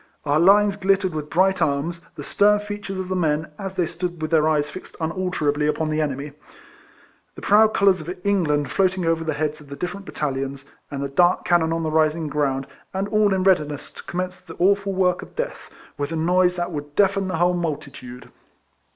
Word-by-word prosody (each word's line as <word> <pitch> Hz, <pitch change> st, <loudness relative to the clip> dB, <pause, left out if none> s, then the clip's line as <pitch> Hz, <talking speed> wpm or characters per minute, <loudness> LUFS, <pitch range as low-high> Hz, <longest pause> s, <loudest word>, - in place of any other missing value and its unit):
Our 145 Hz, +1 st, +2 dB
lines 200 Hz, +3 st, +5 dB
glittering 190 Hz, -2 st, +1 dB
with 150 Hz, -1 st, -5 dB
bright 190 Hz, +2 st, +2 dB
arms; 160 Hz, +4 st, 0 dB
the 145 Hz, -, -7 dB
stern 205 Hz, +6 st, +3 dB
features 205 Hz, -2 st, -6 dB
of 190 Hz, -1 st, -4 dB
the 185 Hz, -, -2 dB
men, 155 Hz, -3 st, 0 dB
as 195 Hz, -1 st, -5 dB
they 180 Hz, -, +1 dB
stood 175 Hz, +1 st, -4 dB
with 155 Hz, 0 st, -4 dB
their 160 Hz, -1 st, +4 dB
eyes 150 Hz, -2 st, +1 dB
fixed 185 Hz, -, -10 dB
unalterably 160 Hz, -3 st, -1 dB
upon 155 Hz, +1 st, -1 dB
the 155 Hz, 0 st, 0 dB
enemy, 145 Hz, 0 st, -3 dB, 1.0 s
the -, -, -11 dB
proud 215 Hz, +1 st, +5 dB
colours 195 Hz, -3 st, +4 dB
of 155 Hz, -, -8 dB
England 150 Hz, -9 st, +1 dB
floating 185 Hz, +2 st, +1 dB
over 165 Hz, 0 st, +1 dB
the 155 Hz, -2 st, -2 dB
heads 150 Hz, 0 st, -2 dB
of 145 Hz, -, -15 dB
the 140 Hz, -, -6 dB
different 190 Hz, +5 st, -5 dB
battalions, 135 Hz, -1 st, -3 dB, 0.2 s
and 140 Hz, -1 st, -4 dB
the -, -, -1 dB
dark 175 Hz, +6 st, +3 dB
cannon 165 Hz, -2 st, +3 dB
on 165 Hz, 0 st, -1 dB
the 155 Hz, -, -1 dB
rising 155 Hz, 0 st, +1 dB
ground, 140 Hz, -2 st, 0 dB, 0.3 s
and 195 Hz, +2 st, -1 dB
all 215 Hz, -1 st, +3 dB
in 190 Hz, -1 st, +1 dB
readiness 150 Hz, -7 st, +1 dB
to -, -, -11 dB
commence 185 Hz, +1 st, -4 dB
the 165 Hz, -2 st, -11 dB
awful 200 Hz, +2 st, +2 dB
work 185 Hz, -1 st, +1 dB
of -, -, -12 dB
death, -, -, -4 dB, 0.3 s
with 145 Hz, +2 st, -2 dB
a -, -, -2 dB
noise 180 Hz, +2 st, +2 dB
that 175 Hz, 0 st, -3 dB
would 145 Hz, -2 st, -6 dB
deafen 195 Hz, -1 st, +2 dB
the 185 Hz, -, -2 dB
whole 175 Hz, +2 st, +3 dB
multi 160 Hz, -5 st, -3 dB
tude. 125 Hz, -1 st, -11 dB
170 Hz, 205 wpm, -23 LUFS, 150-190 Hz, 1.0 s, lines